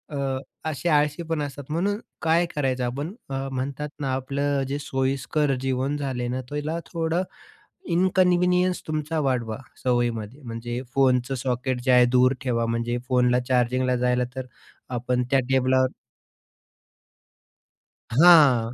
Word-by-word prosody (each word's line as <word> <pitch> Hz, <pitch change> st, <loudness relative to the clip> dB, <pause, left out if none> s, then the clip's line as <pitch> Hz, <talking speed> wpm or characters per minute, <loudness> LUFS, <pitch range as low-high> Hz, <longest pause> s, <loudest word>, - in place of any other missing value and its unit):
अ, 135 Hz, -1 st, -1 dB, 0.3 s
असे 155 Hz, +3 st, -2 dB
आळशी 150 Hz, +2 st, +2 dB
पण 160 Hz, -2 st, 0 dB
असतात, 145 Hz, 0 st, -5 dB
म्हणून 200 Hz, +7 st, 0 dB, 0.2 s
काय 165 Hz, +2 st, +3 dB
करायचं? 130 Hz, -3 st, 0 dB
आपण 145 Hz, +9 st, -4 dB, 0.2 s
अ, 135 Hz, 0 st, -3 dB
म्हणतात 140 Hz, +3 st, -3 dB
ना, 135 Hz, -2 st, -1 dB
आपलं 140 Hz, +2 st, -1 dB
अ, -, -, 0 dB
जे 140 Hz, +1 st, -3 dB
सोयीस्कर 135 Hz, 0 st, 0 dB
जीवन 135 Hz, +2 st, -1 dB
झालंय 130 Hz, -4 st, -3 dB
ना, 130 Hz, +1 st, -2 dB
त्याला 150 Hz, +3 st, -3 dB
थोडा 165 Hz, +1 st, 0 dB, 0.7 s
इनकन्व्हीनियन्स 180 Hz, 0 st, +3 dB
तुमचा 155 Hz, +1 st, -2 dB
वाढवा 120 Hz, -6 st, -1 dB, 0.3 s
सवयीमध्ये. 120 Hz, 0 st, -1 dB
म्हणजे 120 Hz, +1 st, -5 dB
फोनचं 130 Hz, -1 st, +2 dB
सॉकेट 125 Hz, 0 st, -2 dB
जे 130 Hz, -, +1 dB
आहे 125 Hz, 0 st, +7 dB
दूर 130 Hz, +1 st, +5 dB
ठेवा, 120 Hz, -4 st, 0 dB
म्हणजे 115 Hz, +1 st, -1 dB
फोनला 125 Hz, -1 st, +3 dB
चार्जिंगला 125 Hz, 0 st, +2 dB
जायला 125 Hz, 0 st, +1 dB
तर 130 Hz, -1 st, -5 dB, 0.5 s
आपण 125 Hz, +1 st, 0 dB
त्या 135 Hz, -, +4 dB
टेबलावर. 130 Hz, 0 st, +3 dB, 2.2 s
हां. 135 Hz, -5 st, +6 dB
135 Hz, 130 wpm, -24 LUFS, 125-150 Hz, 2.2 s, आहे